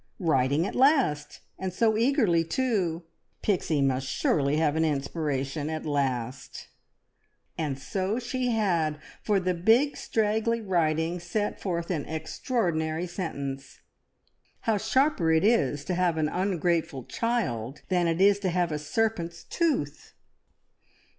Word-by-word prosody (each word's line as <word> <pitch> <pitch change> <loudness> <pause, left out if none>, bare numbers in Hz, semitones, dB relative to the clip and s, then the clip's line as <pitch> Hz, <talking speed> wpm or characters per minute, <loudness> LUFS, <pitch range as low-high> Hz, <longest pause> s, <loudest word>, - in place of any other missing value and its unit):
Writing 145 -2 +2
at - - -4
last, 255 - +2 0.2
and 190 -1 -3
so 220 +4 +2
eagerly 225 - +3
too! 180 -4 -1 0.4
Pixie 165 -7 +1
must 135 -1 0
surely 140 +2 +1
have 155 -2 +2
an 160 - +2
inspiration 145 -1 -2
at 160 0 -4
last; 135 -3 -3 0.9
and 145 -4 -2
so 190 +9 -2
she 255 +1 -2
had, 175 -10 +1 0.2
for 205 -2 +2
the 185 0 0
big 225 +11 +3
straggly 220 +1 0
writing 170 -4 0
set 205 +5 -3
forth 170 -2 -2
an 155 -6 -2
extraordinary 160 -1 -1
sentence: 140 -7 -5 0.8
"How 220 -2 +1
sharper 260 - +2
it 160 0 +3
is 150 - +2
to 185 - -1
have 175 -2 +1
an 155 -1 +1
ungrateful 170 -6 0
child, 150 - -2
than 180 -2 +2
it 165 +1 0
is 200 +1 +5
to 195 -2 -1
have 175 -1 0
a 150 - -2
serpent's 170 0 -2
tooth!" 285 - -2
170 Hz, 130 wpm, -27 LUFS, 150-210 Hz, 0.9 s, is